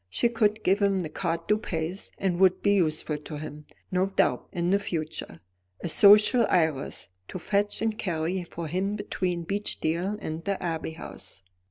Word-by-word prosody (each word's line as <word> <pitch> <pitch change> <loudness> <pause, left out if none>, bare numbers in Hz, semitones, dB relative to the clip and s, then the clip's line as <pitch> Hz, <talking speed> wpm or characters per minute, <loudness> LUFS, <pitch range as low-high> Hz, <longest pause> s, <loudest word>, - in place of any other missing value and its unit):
She 235 - +1
could 220 -2 +1
give 195 +3 +2
him 195 -2 +2
the 160 - -4
carte 165 0 -3
du 210 0 +3
pays, 165 +1 -4
and 180 -3 -1
would 185 -1 +4
be 205 - +4
useful 155 -4 0
to 150 0 -8
him, 150 0 -8 0.2
no 185 +1 +2
doubt, 195 - +1
in 175 +1 -1
the 200 - +4
future; 155 - -5 0.4
a - - -3
social 210 +6 +6
Iris, 160 -6 0 0.2
to - - -6
fetch 205 +4 0
and 220 -1 0
carry 175 +1 -1
for 170 0 -6
him 190 +6 -1
between 180 -4 -2
Beechdale 195 -1 -1
and 160 -2 -5
the 200 +1 -1
Abbey 165 -2 -3
House. 100 - -9
180 Hz, 175 wpm, -27 LUFS, 160-200 Hz, 0.4 s, social